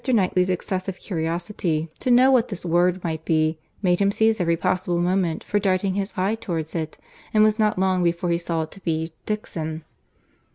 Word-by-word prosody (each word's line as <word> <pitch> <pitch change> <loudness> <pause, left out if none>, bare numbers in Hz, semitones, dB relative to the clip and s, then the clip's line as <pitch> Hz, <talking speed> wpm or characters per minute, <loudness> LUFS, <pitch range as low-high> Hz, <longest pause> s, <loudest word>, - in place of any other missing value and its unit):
Knightley's 190 -7 +2
excessive 185 +1 -2
curiosity 170 -1 -2
to - - -2
know 250 +2 +6
what 250 -2 +4
this 195 -4 -5
word 175 +2 +2
might 160 -2 -3
be, 155 0 +1 0.2
made 180 -2 +3
him 200 0 +3
seize 220 0 +2
every 170 -1 +2
possible 185 0 0
moment 175 -1 0
for 205 - 0
darting 190 -1 +1
his 200 +1 -3
eye 190 +3 +1
towards 170 -8 -4
it, 160 -2 -4 0.4
and 215 - +6
it - - +7
was 215 +1 +2
not 210 -2 +2
long 185 -1 +2
before 170 0 0
he 170 - +1
saw 170 -1 -1
it 155 - -9
to - - -11
be 160 -1 -2
Dixon. 160 -7 -4
180 Hz, 195 wpm, -23 LUFS, 165-200 Hz, 0.4 s, it